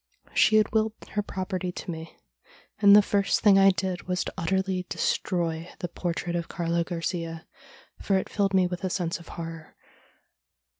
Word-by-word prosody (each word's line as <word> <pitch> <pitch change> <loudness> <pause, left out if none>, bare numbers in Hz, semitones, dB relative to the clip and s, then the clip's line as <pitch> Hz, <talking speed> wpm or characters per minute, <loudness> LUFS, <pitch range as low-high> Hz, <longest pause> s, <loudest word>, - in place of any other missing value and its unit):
She 215 - +4
had 215 -1 +4
willed 220 -1 +1 0.2
her 210 - 0
property 185 -2 -4
to 180 - -6
me, 160 0 -8 0.6
and 200 -1 +8
the 210 - +8
first 200 -1 +1
thing 200 -2 +6
I 195 0 +7
did 185 -2 -2
was 180 0 0
to - - -6
utterly 190 +1 -1
destroy 170 -2 -1
the 175 - -4
portrait 175 0 -3
of 170 -1 -2
Carlo 170 0 -1
Garcia, 165 -1 -4 0.6
for 195 - +2
it 190 - -2
filled 195 -2 0
me 185 -1 +5
with 180 +1 -4
a 185 - 0
sense 175 -2 -2
of 170 - -14
horror. 165 -1 -8
180 Hz, 170 wpm, -27 LUFS, 170-195 Hz, 0.6 s, and